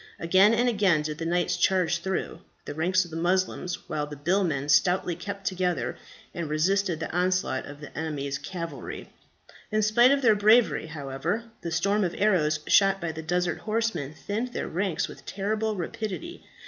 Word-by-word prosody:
Again 190 +6 +5
and 245 +2 +2
again 195 -9 +3
did 150 +1 -4
the 165 - -2
knights 175 +1 +1
charge 175 -3 +2
through 190 +2 -3 0.3
the - - -5
ranks 180 +4 +1
of 170 - -13
the 160 - -5
Moslems, 180 +1 -1
while 150 -1 -2
the 150 - -8
billmen 155 -2 0
stoutly 175 +4 +3
kept 195 +3 -7
together 180 -2 -1 0.4
and 170 -3 -4
resisted 175 +2 +1
the 160 - -4
onslaughts 180 -5 0
of 145 +1 -10
the 150 - -10
enemy's 140 -3 -3
cavalry. 170 -3 -7 0.6
In 215 0 +2
spite 235 +4 +5
of 275 0 +2
their 225 -3 +6
bravery, 215 -3 +4
however, 155 - -3 0.2
the 170 - -4
storm 200 +6 +1
of 175 -2 -2
arrows 155 -8 +2
shot 195 -1 +4
by 170 -3 -3
the 160 0 -7
desert 175 +1 -1
horsemen 215 -10 -2
thinned 225 +8 -4
their - - -3
ranks 180 -1 -1
with - - -12
terrible 215 +2 -2
rapidity. 215 - -5
180 Hz, 175 wpm, -27 LUFS, 160-205 Hz, 0.6 s, their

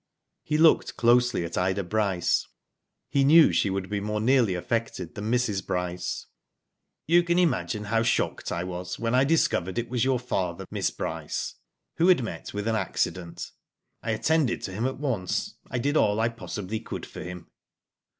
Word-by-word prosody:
He 150 - -1
looked 160 0 +4
closely 120 -5 +3
at 85 - -3
Ida 95 +2 0
Bryce. 95 -2 0 0.6
He 140 - +2
knew 155 +3 +7
she 100 - +2
would 95 -1 -2
be 105 0 -2
more 105 +1 -2
nearly 115 -4 +3
affected 95 -2 -3
than 105 +1 -4
Mrs. 120 -6 +1
Bryce. 90 0 -3 0.8
You 170 +2 +5
can 170 0 0
imagine 105 - +1
how 115 +2 +1
shocked 115 - 0
I 85 - -2
was 90 0 -5
when 115 0 -1
I 130 +1 +5
discovered 135 - +1
it 120 0 -2
was 120 -2 +1
your 130 -1 +2
father, 95 -8 -3
Miss - - 0
Bryce, 80 -2 -4 0.4
who 170 - +4
had 180 -9 +5
met 115 - -6
with 105 +1 -4
an 115 - +1
accident. 95 -3 -2 0.5
I 115 - -5
attended 130 +3 +1
to 95 - -4
him 110 +6 -1
at 130 - -4
once. 120 -11 -2 0.2
I 125 - -2
did 145 +5 0
all 105 -7 +3
I 115 +1 +2
possibly 105 -1 -5
could - - -6
for - - -9
him." 90 -1 -8
110 Hz, 175 wpm, -26 LUFS, 95-125 Hz, 0.8 s, knew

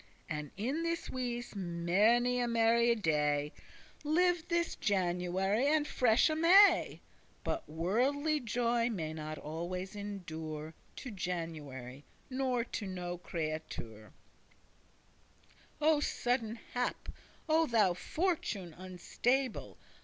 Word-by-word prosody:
And 150 -3 -4
in 260 +10 -1
this 335 0 -2
wise 245 -3 -4
many 200 +8 +2
a 245 - +1
merry 235 0 +4
day 150 -6 +1 0.5
Lived 350 +2 +2
this 340 -1 +1
January 190 +2 +1
and 300 0 +2
fresh 235 -2 +4
May, 350 +6 +5 0.4
But 330 - -3
worldly 260 - +1
joy 235 -1 +1
may 160 -8 -3
not 155 0 -5
always 175 +5 -5
endure 160 -6 -6 0.2
To 250 - -7
January, 155 - -5 0.3
nor 255 -2 0
to 220 -3 -5
no 180 -2 -4
creatucere. 155 - -5 1.7
O 305 0 +4
sudden 245 -5 -1 0.2
hap! 245 0 -2 0.4
O 320 0 +3
thou 215 -7 +3
fortune 205 - -2
unstable! 210 - -2
210 Hz, 100 wpm, -33 LUFS, 170-255 Hz, 1.7 s, May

